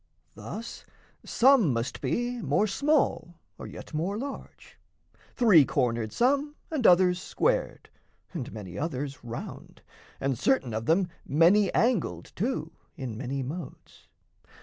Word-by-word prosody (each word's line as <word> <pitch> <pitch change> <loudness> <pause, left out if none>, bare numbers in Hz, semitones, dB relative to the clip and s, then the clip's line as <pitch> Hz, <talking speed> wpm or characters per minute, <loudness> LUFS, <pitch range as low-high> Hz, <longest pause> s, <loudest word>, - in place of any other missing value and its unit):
Thus 230 +2 -8 0.4
some 245 - +4
must 115 0 -3
be 240 0 -1
More 210 - +2
small 270 - +1 0.2
or - - -7
yet - - -10
more 175 +7 -1
large, 275 +4 -8 0.6
three 210 - +6
cornered 120 -5 -1
some 285 +4 +1 0.2
And 285 -7 +2
others 180 0 +5
squared, - - -1 0.5
and 150 -9 -5
many 100 -4 -7
others 140 -3 -4
round, 120 0 -8 0.4
And 135 -3 -1
certain 140 - +1
of 110 +1 -3
them 180 +3 +3 0.2
many 180 +7 +4
angled 235 -5 0
too 170 - -2 0.2
In 125 -5 -5
many 135 +3 -3
modes. 150 +2 -9
175 Hz, 125 wpm, -28 LUFS, -, 0.6 s, three